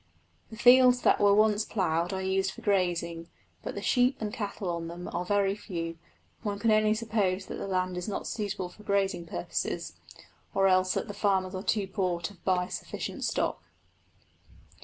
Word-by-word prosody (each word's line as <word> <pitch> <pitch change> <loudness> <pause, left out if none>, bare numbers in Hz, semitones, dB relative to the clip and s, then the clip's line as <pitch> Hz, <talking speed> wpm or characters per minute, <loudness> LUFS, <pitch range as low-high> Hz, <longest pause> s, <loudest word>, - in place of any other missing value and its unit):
The 220 - -10
fields 250 +1 +7
that - - +4
were 200 -1 +5
once 215 0 +4
ploughed 175 -5 0
are 190 -1 -3
used 190 0 +1
for - - -12
grazing, 170 -4 0 0.3
but - - -5
the - - -5
sheep 250 +1 +3
and 215 -1 -3
cattle 205 -4 -4
on 170 -1 -2
them 175 +1 -7
are 175 - -1
very 195 +1 +2
few; 165 -5 -5 0.4
one 205 -3 -2
can 225 +2 +2
only 215 0 +4
suppose 210 -4 0
that - - -6
the - - -5
land 185 -1 -1
is 180 - -4
not 205 - -3
suitable 200 -4 -3
for 195 - -16
grazing 195 -4 0
purposes, 85 - -3 0.6
or 195 0 +4
else 185 0 +3
that - - -2
the 205 - -6
farmers 195 -2 +1
are 185 - -3
too 210 0 0
poor 185 -2 -1
to 170 +4 -4
buy 180 -1 0
sufficient - - -5
stock. - - -1
195 Hz, 180 wpm, -29 LUFS, 180-210 Hz, 0.6 s, fields